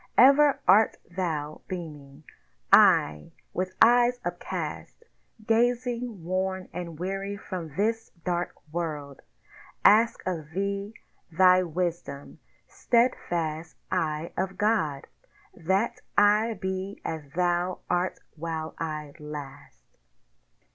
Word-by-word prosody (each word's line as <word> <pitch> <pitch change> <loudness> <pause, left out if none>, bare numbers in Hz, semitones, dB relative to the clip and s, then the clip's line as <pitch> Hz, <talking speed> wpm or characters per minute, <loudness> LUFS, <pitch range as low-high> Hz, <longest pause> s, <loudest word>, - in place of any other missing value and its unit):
Ever 280 +2 +6
art 210 +4 +5 0.2
thou 155 -5 -3
beaming. 150 -5 -8 0.5
I, 75 0 +5 0.2
with 185 0 -3
eyes 245 +1 +5
upcast, 175 - -5 0.4
Gazing 240 -2 0
worn 185 +1 -2
and 170 -3 -6
weary 195 +3 -3
from 170 -7 -7
this 225 +3 0 0.2
Dark 175 0 -1 0.2
World, 150 -5 -4 0.6
Ask 225 +3 +5
of 165 -5 -3
thee 200 +2 -2 0.4
thy 185 +2 +6
Wisdom, 170 -5 -4 0.3
steadfast 170 -10 0
Eye 155 +1 -1
of 190 0 -2
God, 205 -10 +1 0.5
That 190 +7 -1 0.2
I 210 +2 +4
be 190 +1 -4
as 160 -1 -3
Thou 175 0 0
art 180 +1 0 0.2
while 160 0 -4
I 155 -3 -4
last. 145 - -9
180 Hz, 100 wpm, -27 LUFS, 160-205 Hz, 0.6 s, Ever